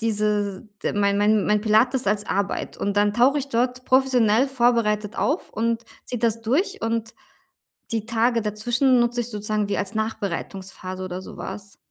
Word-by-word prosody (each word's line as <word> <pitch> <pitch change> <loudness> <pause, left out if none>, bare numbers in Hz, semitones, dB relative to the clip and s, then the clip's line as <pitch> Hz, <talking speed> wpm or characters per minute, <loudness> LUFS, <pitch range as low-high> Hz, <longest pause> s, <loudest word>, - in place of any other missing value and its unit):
diese 210 -3 0 0.2
d - - 0
mein 200 -1 +2
mein 210 0 +3
mein 210 0 +3
Pilates 230 +4 +3
als 205 0 0
Arbeit 200 0 -2
und 200 0 -2
dann 205 0 +3
tauche 260 +5 +4
ich 275 0 -4
dort 250 +1 0
professionell 255 -2 +3
vorbereitet 230 -4 +1
auf 300 +5 -1
und 230 +1 -1 0.2
ziehe 245 - -4
das 230 -1 +1
durch, 350 - 0
und 225 0 -2 0.8
die 220 -2 -1
Tage 230 0 +1
dazwischen 240 +5 +2
nutze 240 0 +1
ich 235 - -6
sozusagen 210 -1 -2
wie 205 - -1
als 205 +3 -3
Nachbereitungsphase 190 -3 -4
oder 185 0 -5
so - - -10
was. 200 0 -8
220 Hz, 165 wpm, -23 LUFS, 205-240 Hz, 0.8 s, tauche